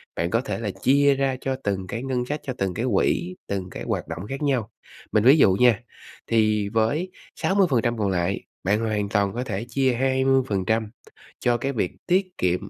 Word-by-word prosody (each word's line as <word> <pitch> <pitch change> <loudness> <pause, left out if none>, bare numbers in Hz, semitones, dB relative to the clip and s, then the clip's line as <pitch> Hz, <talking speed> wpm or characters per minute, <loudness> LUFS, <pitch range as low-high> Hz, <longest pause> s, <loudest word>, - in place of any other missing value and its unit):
bạn 85 +1 -1
có 115 +5 +1
thể 135 - -4
là 115 -3 -2
chia 140 +5 +3
ra 135 -1 0
cho 135 -1 -1
từng 95 -2 -2
cái 115 +5 -4
ngân 130 -2 -1
sách, 150 +4 -3
cho 130 - -3
từng 95 -2 -1
cái 115 - -2
quỹ, 175 - +1
từng 95 -2 -3
cái - - -7
hoạt - - -2
động 90 +5 -6
khác 135 +1 -5
nhau. 130 -7 0 0.4
Mình 105 - +3
ví 135 +6 +7
dụ 100 -10 +5
nha, 115 +1 +4 0.5
thì 110 -2 +2
với 115 - 0 0.2
60% 135 - +1
còn 105 -2 0
lại, 90 +1 0 0.2
bạn 100 +3 +2
hoàn 105 -2 -1
toàn 100 -2 +1
có 125 - -2
thể 110 -2 -4
chia 130 +1 +2
20% 125 -5 +1 0.5
cho 120 -1 +2
cái 135 +4 -2
việc 105 -7 -1 0.2
tiết 185 0 +1
kiệm, 90 0 0
115 Hz, 200 wpm, -24 LUFS, 100-135 Hz, 0.5 s, ví